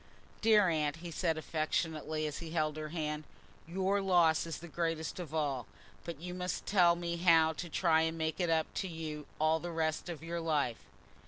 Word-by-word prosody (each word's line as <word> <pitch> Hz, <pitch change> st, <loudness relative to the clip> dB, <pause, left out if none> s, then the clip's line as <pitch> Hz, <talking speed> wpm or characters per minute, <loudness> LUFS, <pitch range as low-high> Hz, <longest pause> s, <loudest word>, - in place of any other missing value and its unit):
"Dear 215 Hz, -3 st, +6 dB
Aunt," 155 Hz, -3 st, +1 dB
he 170 Hz, +1 st, -8 dB
said 165 Hz, 0 st, 0 dB
affectionately, 155 Hz, -1 st, -1 dB
as 150 Hz, -1 st, -3 dB
he 165 Hz, -, -7 dB
held 155 Hz, -2 st, 0 dB
her 155 Hz, 0 st, -5 dB
hand, 150 Hz, -2 st, -3 dB, 0.4 s
"your 190 Hz, +3 st, +1 dB
loss 170 Hz, -4 st, +4 dB
is 165 Hz, -, -4 dB
the 170 Hz, -, -9 dB
greatest 165 Hz, 0 st, -2 dB
of 170 Hz, -4 st, -6 dB
all, 140 Hz, -7 st, -1 dB, 0.4 s
but 170 Hz, -4 st, -6 dB
you 180 Hz, +2 st, -6 dB
must 180 Hz, 0 st, -3 dB
tell 175 Hz, -4 st, +5 dB
me 170 Hz, 0 st, -3 dB
how 165 Hz, -2 st, +5 dB
to 170 Hz, +2 st, -6 dB
try 160 Hz, -1 st, +3 dB
and 160 Hz, 0 st, 0 dB
make 160 Hz, +1 st, -2 dB
it 175 Hz, -2 st, +1 dB
up 160 Hz, -1 st, +3 dB, 0.2 s
to 190 Hz, -, -3 dB
you 155 Hz, -3 st, -6 dB
all 155 Hz, +1 st, +3 dB
the 175 Hz, -, -5 dB
rest 160 Hz, 0 st, -1 dB
of 165 Hz, -3 st, -6 dB
your 170 Hz, +1 st, -3 dB
life." 150 Hz, -8 st, 0 dB
165 Hz, 195 wpm, -33 LUFS, 155-175 Hz, 0.4 s, Dear